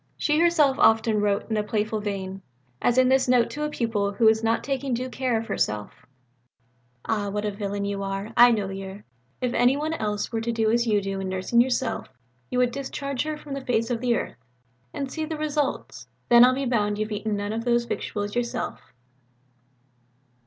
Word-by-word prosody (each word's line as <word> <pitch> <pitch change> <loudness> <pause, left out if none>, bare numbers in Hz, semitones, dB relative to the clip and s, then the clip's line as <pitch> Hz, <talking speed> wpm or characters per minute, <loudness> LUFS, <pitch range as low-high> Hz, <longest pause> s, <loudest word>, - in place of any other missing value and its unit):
She 300 0 +1
herself 320 -5 +4
often 220 -1 +4
wrote 205 -1 0
in 220 - +1
a 210 - +1
playful 215 +1 -1
vein; 195 -2 -4 0.4
as 245 - +2
in 255 0 +5
this 265 0 +3
note 245 -2 +3
to 300 - -6
a - - -2
pupil 220 -7 -1
who 225 +3 +1
was 220 0 +4
not 225 +1 +1
taking 270 -2 -1
due 255 +2 -4
care 255 -3 0
of 225 - -6
herself: 105 - -3 1.0
"Ah, 210 -2 -1
what 210 +1 -3
a 210 - 0
villain 200 0 -3
you 200 0 -3
are! 195 +2 -4
I 240 0 +8
knowed 205 -4 0
yer! 195 +1 -8 0.4
If 250 -1 -1
any 245 +3 +3
one 310 +2 -2
else 210 -7 -2
were 225 -1 -1
to 235 +1 -1
do 225 -1 +1
as 235 +1 +2
you 210 -2 +2
do 195 0 -3
in 190 -1 -3
nursing 190 +6 +2
yourself, 250 0 -1 0.4
you 250 - -2
would 250 -1 +3
discharge 275 0 -4
her 310 -1 -3
from 295 -2 -8
the 275 - -4
face 230 -2 0
of 235 -1 -1
the 245 -2 +2
earth. - - -4 0.5
And 275 -2 -4
see 315 - -3
the 315 0 -4
results! 300 -2 -2 0.2
Then, 240 0 +8
I'll 255 +1 +5
be 275 +1 -2
bound 210 -4 0
you've 215 +1 -3
eaten 210 0 -2
none 205 +1 -3
of 225 +1 -3
those 240 0 +2
victuals 205 -3 -4
yourself." 240 -1 -3
230 Hz, 205 wpm, -25 LUFS, 205-255 Hz, 1.0 s, I